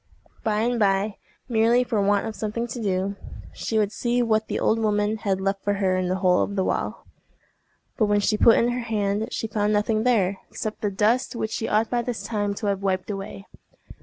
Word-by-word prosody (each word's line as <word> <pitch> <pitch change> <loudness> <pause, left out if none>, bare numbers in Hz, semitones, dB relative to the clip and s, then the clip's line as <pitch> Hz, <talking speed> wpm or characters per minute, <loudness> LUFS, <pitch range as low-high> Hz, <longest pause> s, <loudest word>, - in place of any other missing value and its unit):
By 215 -1 +1
and 240 +1 0
by, 200 0 +1 0.3
merely 235 +1 +3
for 225 -4 0
want 200 0 +2
of 220 -1 -5
something 220 +2 -3
to 240 0 -6
do, 195 -1 -1 0.4
she 220 - -2
would 210 -1 +2
see 240 +2 0
what 220 -1 +1
the - - -2
old 225 - +2
woman 210 0 +1
had 195 -3 -1
left 195 0 -2
for 205 - +1
her 190 -2 +1
in 185 -1 0
the 185 - 0
hole 185 -1 +3
of 200 - -2
the 190 - +1
wall. - - -2 0.9
But 215 - +3
when 205 0 +3
she 210 +1 +1
put 225 +2 +6
in 235 - +3
her 245 +1 -1
hand 215 -2 -1
she - - -3
found 210 -1 0
nothing 215 +1 +1
there, 200 -6 +2
except 215 -1 -5
the 210 - 0
dust 215 +7 +1
which 220 -1 -3
she 225 - -2
ought 215 +1 +1
by 240 -1 +1
this 235 -1 -4
time 205 -2 -2
to 210 - -5
have 200 -1 0
wiped 190 0 -1
away. 195 0 -7
210 Hz, 220 wpm, -24 LUFS, 200-225 Hz, 0.9 s, put